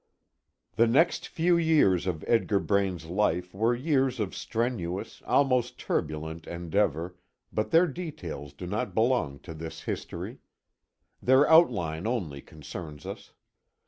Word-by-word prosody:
The 115 - +5
next 155 +9 +3
few 170 +2 +2
years 150 - +3
of 80 -4 -3
Edgar 110 -3 +3
Braine's 95 -4 0
life 90 -1 0
were 115 +5 +2
years 130 -2 +1
of 105 -4 -2
strenuous, 110 -6 -3
almost 125 -3 +2
turbulent, 80 +1 -3
endeavor, 85 0 -1 0.4
but 110 - -1
their 165 +2 +6
details 130 - -6
do 90 - -8
not 105 +7 -3
belong 115 - +1
to 85 - -8
this 80 0 -7
history. - - -5 0.8
Their 130 +3 +5
outline 90 - +4
only 90 - -2
concerns 75 0 -9
us. - - -8
100 Hz, 125 wpm, -28 LUFS, 85-125 Hz, 0.8 s, their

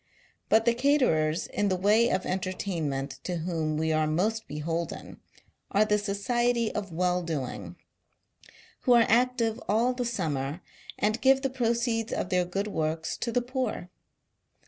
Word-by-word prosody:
But, 220 +1 +4
the 235 - +4
caterers 235 - +2
in 205 -1 -1
the 185 - +1
way 210 +5 +3
of 185 - 0
entertainment 165 -8 -3
to 180 - -3
whom 160 -2 -2
we 160 0 +1
are 155 0 +2
most 210 +8 0
beholden, 165 +3 -4 0.5
are 205 +2 +3
the 210 0 +2
Society 235 +3 0
of 205 -2 -3
Welldoing, 160 - -2 1.0
who 250 - +3
are 235 -1 +6
active 235 -1 +2
all 230 +5 +3
the 250 0 -2
summer, 155 - -2 0.4
and 215 +3 0
give 270 +1 +4
the 270 - 0
proceeds 235 -2 0
of 180 - -2
their 180 -1 +2
good 195 +3 -2
works 160 -4 -2
to 235 - -2
the 245 +1 +1
poor. 255 -8 -3
200 Hz, 145 wpm, -28 LUFS, 160-235 Hz, 1.0 s, are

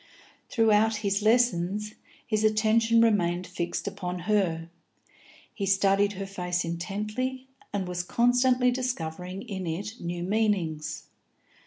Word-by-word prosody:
Throughout 220 -1 +3
his 200 +1 +1
lessons, 210 -3 +2 0.3
his 215 -1 0
attention 220 +1 +3
remained 180 -6 +2
fixed 175 0 -4
upon 180 -3 -4
her; 175 -4 0 0.9
he 200 - -3
studied 195 +1 +3
her 195 0 -5
face 180 -2 -2
intently, 215 +10 -3 0.3
and 195 -3 -2
was 180 0 -2
constantly 250 +5 +3
discovering 185 -7 -4
in 190 -4 -5
it 205 +8 -4
new 175 0 -3
meanings. 190 -6 -1
200 Hz, 115 wpm, -27 LUFS, 180-220 Hz, 0.9 s, Throughout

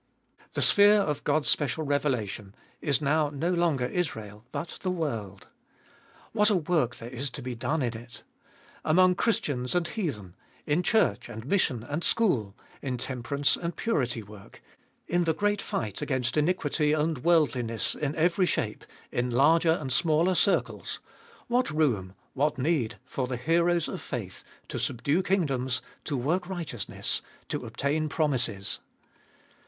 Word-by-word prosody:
The - - +1
sphere 205 +1 +7
of 150 -7 -1
God's 155 - +1
special 150 +2 +1
revelation 120 -9 -1 0.3
is 140 -2 +1
now 150 +1 +2
no 150 +5 -1
longer 170 -8 +2
Israel, 110 - -3
but 170 - -5
the 185 - -1
world. 115 - -3 0.9
What 210 +1 +4
a 210 - +3
work 155 -7 +1
there 115 - -8
is 135 +2 -2
to 130 +1 -8
be 125 0 -3
done 145 +6 -1
in 120 -2 -1
it! 120 +1 -10 0.6
Among 180 +3 +5
Christians 145 - 0
and 175 -1 +2
heathen, 120 - -4 0.3
in 150 +3 +2
church 220 - +2
and 110 0 -7
mission 135 - +1
and 145 +7 -3
school, 120 - +2 0.3
in 130 -3 -2
temperance 130 +3 0
and 170 0 -4
purity 125 - 0
work, 100 -1 -14 0.4
in 175 0 +1
the 160 - +1
great 205 0 +1
fight 105 -4 -3
against 130 -3 -1
iniquity 150 -1 +2
and 155 -3 0
world 165 -3 +4
liness 115 -4 -1
in 150 0 -2
every 175 +3 +2
shape, - - -1 0.3
in 125 +1 0
larger 160 +7 +4
and 135 -6 -2
smaller 165 +5 +3
circles 195 +2 +1 0.2
— 460 0 -25
what 245 +1 +2
room, 120 -12 0 0.2
what 145 +2 +1
need 135 -4 0
for 130 0 -3
the 125 -1 -3
heroes 170 +5 +2
of - - -5
faith - - -5 0.3
to - - -3
subdue 140 +8 +1
kingdoms, 135 -10 +1 0.3
to 140 - -1
work 175 +9 0
righteousness, 165 - -3 0.3
to - - -3
obtain 150 +3 -1
promises 130 - 0
145 Hz, 150 wpm, -28 LUFS, 125-170 Hz, 0.9 s, sphere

